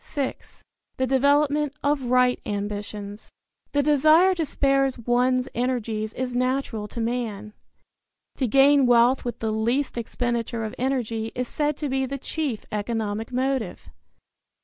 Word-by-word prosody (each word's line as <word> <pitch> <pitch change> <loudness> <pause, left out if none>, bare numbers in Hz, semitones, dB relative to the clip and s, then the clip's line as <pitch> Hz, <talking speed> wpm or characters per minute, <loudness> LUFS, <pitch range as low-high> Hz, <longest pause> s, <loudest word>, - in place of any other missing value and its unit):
VI. 275 -3 -2 0.6
THE 260 - +1
DEVELOPMENT 285 +2 +2
OF 285 -2 +1
RIGHT 250 0 +3
AMBITIONS. 205 0 -5 0.4
The 285 0 +2
desire 310 +6 +5
to 330 -4 -2
spare 275 -1 +2 0.2
one's 250 +1 +2
energies 225 -3 -2
is 255 -1 -3
natural 250 -4 -1
to 235 - -8
man. 225 -3 -3 0.8
To 260 - 0
gain 275 +2 +5
wealth 245 +2 +4
with 240 -1 -4
the 220 -1 -2
least 240 +4 0
expenditure 235 0 -2
of 220 - -4
energy 235 -4 -1
is 250 0 -2
said 295 +1 -1
to 300 - -3
be 265 0 0
the 275 +2 -4
chief 275 -4 -3
economic 215 +1 -3
motive. 255 - -2
250 Hz, 135 wpm, -24 LUFS, 225-275 Hz, 0.8 s, desire